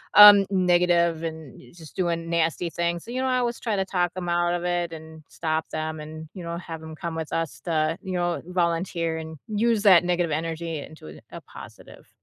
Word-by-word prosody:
um, 205 -1 +10
negative 175 -3 +2
and 160 -4 -7 0.2
just 160 -3 -13
doing 170 -3 -1
nasty 165 0 0
things, 170 0 -2
so, 235 - -8
you 255 +1 -2
know, 260 - 0
I 255 - +2
always 240 -1 -1
try 225 -3 -1
to 195 -1 0
talk 180 -2 0
'em 175 -1 -4
out 175 0 +1
of 175 - -4
it 175 -1 -1
and 160 -1 -11
stop 160 -1 -2
them 155 0 -4
and, 155 +1 -8
you 185 - -8
know, 170 0 -4
have 165 -2 -7
'em 160 0 -9
come 165 +1 -5
with 160 -1 -5
us 165 -2 -2
to, 160 -2 0
you 190 -2 -5
know, 175 -1 -1
volunteer 170 -2 -1
and 160 0 -8
use 220 0 +1
that 185 -4 +7
negative 175 -2 0
energy 165 +1 -3
into 80 - -11
a - - -8
positive. - - -13
170 Hz, 205 wpm, -25 LUFS, 160-180 Hz, 0.2 s, um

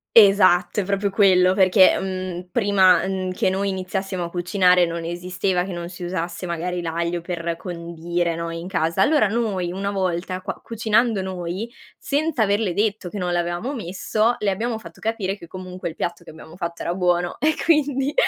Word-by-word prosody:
Esatto, 195 -2 +6
è - - -3
proprio 200 +1 0
quello 185 -2 +4
perché, 190 0 +5
mhmm, 185 -1 -4
prima, 195 -3 +4
uhm, 190 -1 -2
che 185 - +1
noi 195 +1 -1
iniziassimo 190 -1 -3
a - - -6
cucinare 180 0 +3
non 170 0 -4
esisteva 180 +1 -1
che 190 - -6
non 170 -1 -5
si 175 0 -9
usasse 175 0 -4
magari 175 +1 -3
l'aglio 170 +1 -2
per 170 -1 -3
condire, 170 -1 -3
no, 170 0 -4
in 165 +1 -6
casa, 165 -3 0
allora 295 -9 +4
noi 200 -6 -1
una 195 +2 -3
volta 185 -1 -2
qua - - -5
cucinando 225 -1 +1
noi, 185 +4 -4 0.3
senza 285 -4 0
averle 205 -2 +1
detto 210 0 0
che 190 - -6
non 180 -1 -1
l'avevamo 175 +9 -1
messo, 215 +2 0
le 210 - +1
abbiamo 220 +4 -1
fatto 170 -5 -13
capire 210 -3 -2
che 170 - -12
comunque 185 0 -7
il 160 - -6
piatto 170 0 -4
che - - -10
abbiamo 160 +2 -13
fatto 170 -2 -5
era 170 - -1
buono, 175 -1 0
e 310 +1 +2
quindi 290 -3 +2
185 Hz, 180 wpm, -22 LUFS, 175-200 Hz, 0.3 s, Esatto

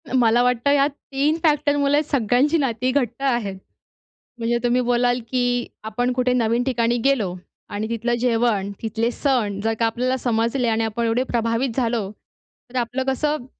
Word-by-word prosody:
मला 240 -1 +4
वाटतं 250 +3 +2
यात 285 0 +3 0.2
3 290 +4 +1
फॅक्टरमुळे 290 -2 +2
सगळ्यांची 275 +3 +2
नाती 255 -2 0
घट्ट 250 -2 -1
आहेत. 235 -7 0 0.8
म्हणजे 235 +1 0
तुम्ही 245 +1 +2
बोलाल, 245 0 +1
की 245 -1 0 0.2
आपण 245 +3 -1
कुठे 250 0 +1
नवीन 235 0 +1
ठिकाणी 240 -2 +1
गेलो 215 -10 +1 0.4
आणि 210 +2 -3
तिथलं 230 +1 -1
जेवण, 230 -5 +1
तिथले 225 +1 -1
सण 235 -8 0
जर 225 0 +1
का 230 - +3
आपल्याला 250 +3 0
समजले 235 +1 0
आणि 225 0 +1
आपण 225 +1 -2
एवढे 230 +3 +1
प्रभावित 235 +1 0
झालो, 230 -5 0 0.6
तर 255 - -4
आपलं 245 +2 -2
कसं, 295 0 -1
245 Hz, 155 wpm, -22 LUFS, 230-260 Hz, 0.8 s, मला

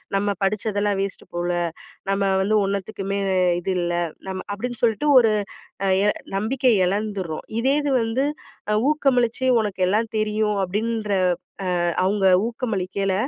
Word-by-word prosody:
"நம்ம 200 +1 +1
படிச்ததெல்லாம் 205 0 0
வேஸ்ட்டு 195 -1 -5
போல, 175 0 -1 0.6
நம்ம 195 0 +1 0.2
வந்து 205 +3 +1
ஒன்னத்துக்குமே 200 0 -3 0.2
அ - - +2 0.2
இது 190 - -2
இல்ல, 175 0 -1 0.3
நம்ம." 190 -1 -4
அப்படின்னு 240 +4 -4
சொல்ட்டு 235 +6 +2
ஒரு 225 -3 +4 0.7
எ - - +3 0.3
நம்பிக்கைய 225 -1 +2
இழந்துர்றோம். 195 -5 -3
இதே 265 +3 +2
இது 290 -1 -1
வந்து 230 +4 0 0.5
அ - - +3 0.2
ஊக்கமளிச்சி, 260 -5 +1
"உனக்கு 205 -3 -3
எல்லாம் 215 +3 +1
தெரியும்" 215 -1 0
அப்படின்ற 215 +3 -2 0.8
அ - - +2 0.2
அவுங்க 195 +1 +2 0.2
ஊக்கமளிக்கையில 195 -5 -2
210 Hz, 130 wpm, -23 LUFS, 195-225 Hz, 0.8 s, ஒரு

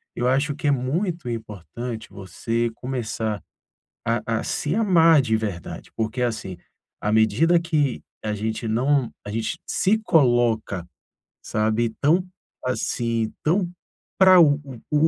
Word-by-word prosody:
eu 120 - 0
acho 140 +3 +1
que 150 - -3
é - - +5
muito 155 +5 -1
importante 110 +1 -6
você 115 +4 -2
começar 110 -5 -3 0.7
a 115 +1 +1 0.2
a - - -5
se 150 - -1
amar 165 -8 +5
de 110 -3 +1
verdade, 100 -6 -5
porque, 115 +3 -1
assim, 110 -6 -2 0.4
à 105 - -1
medida 110 +11 +4
que 150 -6 0 0.2
a 105 - -1
gente 110 +2 -3
não 130 +3 +2 0.2
a 105 - -4
gente 110 +1 -2
se 215 +4 +2
coloca, 120 - +2 0.6
sabe, 110 +2 0
tão 170 +6 +3 0.4
assim, 115 -3 -1
tão 175 +3 +2 0.5
pra 185 -1 +8
o 145 -4 +6
o 135 -4 -9
o 150 +1 +4
120 Hz, 135 wpm, -23 LUFS, 110-150 Hz, 0.7 s, pra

